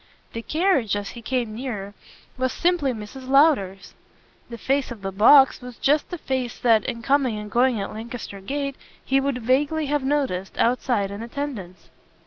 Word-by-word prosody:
The 230 - -4
carriage, 305 - +1
as 205 -1 -4
he 235 - -10
came 240 -2 -2
nearer, 215 -5 -5 0.4
was 260 0 -1
simply 340 -6 +1
Mrs. 240 +3 -8
Lowder's; 265 - +3 0.6
the 235 - -7
face 270 +3 -1
on 230 -4 -8
the 195 0 -4
box 265 +9 +6
was 245 -1 -10
just 295 +2 +1
the 355 - -5
face 260 -6 -3
that, 225 -3 +3
in 235 -2 -4
coming 270 -4 +2
and 210 0 -7
going 245 0 +2
at 195 - -4
Lancaster 220 -2 -7
Gate, 275 +5 -3 0.3
he 270 +1 +2
would 270 -3 -2
vaguely 290 +6 +1
have 290 -1 -1
noticed, 265 -10 -1
outside, 235 -4 +1
in 200 +2 -6
attendance. 230 -8 -6
250 Hz, 170 wpm, -23 LUFS, 215-275 Hz, 0.6 s, box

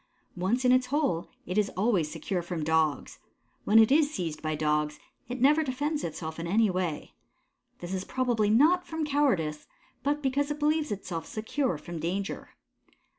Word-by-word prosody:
Once 205 +8 0
in 250 - +5
its 255 0 +3
hole, 275 - 0 0.2
it 180 +4 0
is 205 - +1
always 190 -7 +2
secure 175 +3 -3
from 170 -2 -4
Dogs. 160 -2 0 0.5
When 210 - +5
it 225 +2 +7
is 295 0 +4
seized 165 - -4
by 155 -1 -2
Dogs, 150 0 0 0.3
it 250 +1 -4
never 295 +5 +5
defends 290 +3 -2
itself 160 0 -5
in 165 - -4
any 210 +3 +3
way. 180 -4 -3 0.7
This 175 +1 -5
is 190 -1 -2
probably 240 -3 0
not 315 +11 +4
from 320 -1 -2
cowardice, 225 - 0 0.3
but 290 +2 -1
because 280 +2 0
it 295 - -2
believes 305 +1 +1
itself 180 -5 -4
secure 220 - -2
from 165 +2 -7
danger. 190 +5 -3
210 Hz, 170 wpm, -28 LUFS, 165-280 Hz, 0.7 s, it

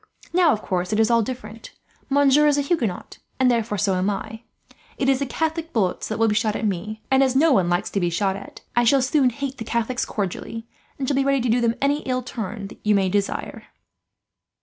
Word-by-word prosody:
"Now, 350 -3 +5
of 215 - -2
course, 180 0 -2
it 215 - +1
is 220 +1 +3
all 230 0 +4
different. 225 -1 -7 0.4
Monsieur 285 +1 +4
is 290 -1 +3
a - - +2
Huguenot, 255 - -2 0.2
and 255 -1 +4
therefore 230 -3 0
so 200 -1 +1
am 185 +2 +1
I. 220 +2 -5 0.6
It 270 - 0
is 270 -1 +3
the 280 - -2
Catholic 320 +3 -2
bullets 190 -6 0
that 220 - -3
will 225 0 +3
be 210 - +2
shot 215 0 0
at - - -2
me 215 +3 -3
and, 265 0 +5
as 260 -1 +2
no 310 +4 +4
one 185 -7 +2
likes 175 +1 0
to 200 - 0
be 175 -2 +1
shot 190 +3 0
at, 200 - -10
I 240 - +4
shall 260 +3 +4
soon 265 0 +3
hate 270 +2 -5
the - - -3
Catholics 235 +2 -1
cordially, 215 +3 -4 0.3
and 270 - -3
shall 285 - +1
be 275 0 +2
ready 275 -1 +2
to 245 - -1
do 240 +2 +2
them 235 -1 +1
any 285 +1 +2
ill 255 -2 -2
turn 220 -4 -5
that - - -13
you 210 0 +3
may 190 -1 +2
desire." 200 +1 -2
230 Hz, 235 wpm, -23 LUFS, 210-270 Hz, 0.6 s, Now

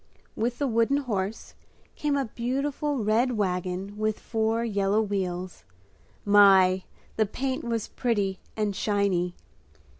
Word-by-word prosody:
With 240 +2 -1
the 285 - 0
wooden 230 +2 +2
horse 215 -6 -3 0.4
came 290 -1 0
a 275 - 0
beautiful 270 +3 -2
red 230 +4 +2
wagon 185 +1 -2
with 215 0 0
four 225 +1 0
yellow 200 -1 +1
wheels. 185 - -3 0.6
My! 190 -2 +6 0.3
The 220 -1 +2
paint 260 +5 -3
was 230 -2 -2
pretty 205 -6 -1 0.2
and 210 -2 0
shiny. 195 -4 0
215 Hz, 120 wpm, -27 LUFS, 195-235 Hz, 0.6 s, My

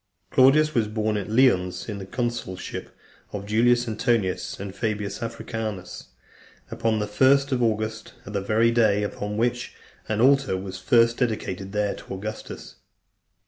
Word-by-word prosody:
II. - - -22
Claudius 150 +4 +5
was 115 -3 +1
born 110 0 -1
at 105 0 -3
Lyons, 110 -7 +2
in 105 -3 -5
the 95 - -8
consulship 120 -5 -4 0.4
of 100 -1 -5
Julius 120 +3 +3
Antonius, 110 -4 -1
and 100 -1 -6
Fabius 105 -1 -3
Africanus, 110 -5 -5 0.6
upon 115 -1 0
the 105 - -1
first 135 +6 +3
of 130 -2 +1
August, 110 -1 -1
the 100 0 -3
very 110 +4 +2
day 110 -3 +3
upon 105 0 -4
which 120 +2 -1 0.3
an 110 -1 0
altar 135 -4 +4
was 95 0 -6
first 115 +4 +3
dedicated 100 -5 -2
there 105 0 0
to - - -8
Augustus. 105 +3 -7
110 Hz, 145 wpm, -25 LUFS, 100-120 Hz, 0.6 s, Claudius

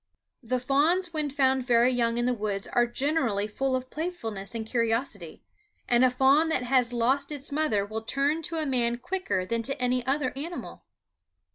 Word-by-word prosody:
The 255 +1 -1
fawns 315 +8 +1
when 305 -2 -1
found 265 -2 +1
very 240 0 +4
young 235 -2 0
in 240 - +1
the 250 - +2
woods 205 -3 -3
are 240 0 +2
generally 240 -5 0
full 260 +5 -1
of 255 0 -5
playfulness 230 - -4
and 225 -1 -3
curiosity; 225 - -2 0.4
and 240 +1 +4
a 255 - +6
fawn 270 +5 +3
that 260 -6 0
has 250 -1 +2
lost 260 +5 +1
its 285 -1 -2
mother 280 -10 +1
will 215 +2 -5
turn 280 +7 0
to 330 +1 -3
a 315 - -1
man 240 -3 +1
quicker 250 - -2
than 230 +4 -1
to 270 +3 -2
any 250 0 +1
other 270 -1 0
animal. 325 +6 -7
255 Hz, 180 wpm, -27 LUFS, 230-285 Hz, 0.4 s, a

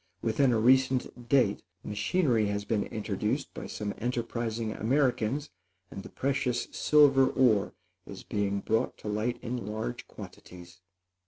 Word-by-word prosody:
Within 125 +4 +2
a 115 - +2
recent 130 0 +2
date 125 -7 +3 0.2
machinery 115 - +1
has 100 0 -2
been 105 -1 0
introduced 110 - -3
by - - -7
some 105 -1 -4
enterprising 115 -2 -2
Americans, 130 +3 0 0.4
and 95 - -7
the - - -11
precious 135 -3 -1
silver 140 -3 +5
ore 110 -8 +2 0.3
is 95 - -9
being 100 -1 -1
brought 110 +2 0
to - - -10
light 110 +4 -1
in 120 -3 -4
large 105 - -4
quantities. 90 0 -12
115 Hz, 135 wpm, -29 LUFS, 105-130 Hz, 0.4 s, silver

